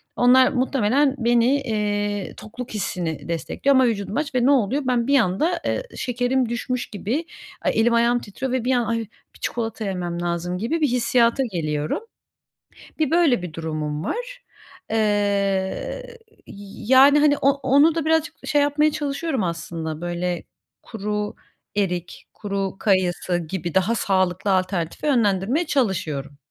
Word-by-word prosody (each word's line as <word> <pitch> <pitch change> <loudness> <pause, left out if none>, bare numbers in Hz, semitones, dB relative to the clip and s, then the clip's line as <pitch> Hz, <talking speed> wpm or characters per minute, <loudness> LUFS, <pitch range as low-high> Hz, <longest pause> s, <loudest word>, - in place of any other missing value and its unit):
onlar 255 +1 +5
muhtemelen 265 +2 +2
beni, 235 0 +3 0.2
eee, 205 -4 -2
tokluk 235 +2 -8
hissini 175 -6 -3
destekliyor 220 - 0
ama 260 -1 +5
vücudum 210 0 -2
aç 295 -3 -2
ve 245 - +3
ne 275 - +5
oluyor? 270 +2 +2
Ben 245 -1 +1
bir 280 0 +5
anda, 280 - +1
ııı, - - -1
şekerim 245 0 0
düşmüş 250 +1 -3
gibi, 230 - -3 0.4
ay, - - +1
elim 235 +1 +3
ayağım 235 +1 +3
titriyor 245 +5 -5
ve 260 -2 0
bir 260 - +2
an 240 -2 +1
"Ay, 230 +1 0 0.4
bir - - -17
çikolata 225 -2 -3
yemem 175 -3 -3
lazım." 175 +1 -2
gibi 240 - -2
bir 300 - +4
hissiyata 240 +1 +2
geliyorum. 155 -3 -2 1.0
Bir 310 -1 +1
böyle 325 - +3
bir 180 -3 -7
durumum 155 -2 -3
var. - - -5 0.5
Eee, 225 - +1 1.5
y 200 +1 -11
yani, 280 +3 +7
hani, 290 -1 +4
o 275 - +5
onu 285 +3 +3
da 325 -2 -1
birazcık 320 0 +1
şey 290 -1 +3
yapmaya 300 +1 +2
çalışıyorum 290 - -2
aslında, 165 -2 -4
böyle 175 0 -2 0.4
kuru 210 -1 -4 0.4
erik, 180 -4 -2
kuru 195 -2 -3
kayısı 185 -3 +1
gibi 170 0 -4
daha 190 +5 +2
sağlıklı 185 -2 +1
alternatife 185 - -1
yönlendirmeye 235 - +2
çalışıyorum. 155 - -1
225 Hz, 145 wpm, -23 LUFS, 185-265 Hz, 1.5 s, yani